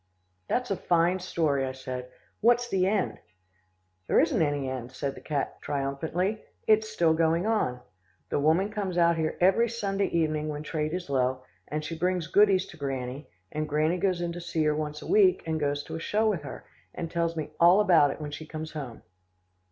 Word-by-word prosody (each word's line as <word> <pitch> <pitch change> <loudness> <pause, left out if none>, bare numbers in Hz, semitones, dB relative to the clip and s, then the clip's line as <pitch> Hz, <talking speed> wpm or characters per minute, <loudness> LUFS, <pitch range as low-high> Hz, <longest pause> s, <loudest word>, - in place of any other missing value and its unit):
"That's 250 -3 -1
a - - +2
fine 175 +2 +2
story," 155 -6 0
I 130 0 -3
said 130 -1 -6 0.3
"what's 240 +2 +3
the 190 -4 +1
end?" 200 -1 0 0.9
"There - - +4
isn't - - +2
any 145 -3 0
end," 130 -2 -5
said 140 +1 -2
the - - -12
black - - -28
cat 145 -3 -2
triumphantly. 160 +9 -2 0.2
"It's 215 0 +3
still 170 -7 +2
going 165 +2 +2
on. 170 - 0 0.5
The - - 0
woman 165 +8 +2
comes 195 -4 -3
out 170 -1 +4
here 160 -1 -2
every 195 +6 +4
Sunday 200 -3 -1
evening 155 -2 0
when 150 0 -4
trade 155 +1 -2
is 180 -1 -5
low, 130 -1 0 0.2
and 150 +1 -3
she 165 - -4
brings 180 0 0
goodies 195 +2 +4
to 160 - -12
Granny, 135 -1 -4 0.2
and 155 0 -3
Granny 155 +4 +1
goes 180 -1 +1
in 170 -1 -1
to 175 +1 -6
see 170 -2 -1
her 150 0 +2
once 150 0 -4
a - - -8
week, 385 -2 +4
and 160 -1 -1
goes 145 -1 -1
to - - -7
a - - -4
show 215 +6 +1
with 195 -7 0
her, 140 - -9 0.3
and 165 -1 -5
tells 170 -1 0
me 150 -1 -4
all 175 +4 +7
about 175 -8 +5
it 135 - -5
when 150 -1 -5
she 155 +1 -7
comes 155 0 -6
home." 140 -7 -7
160 Hz, 205 wpm, -28 LUFS, 145-185 Hz, 0.9 s, all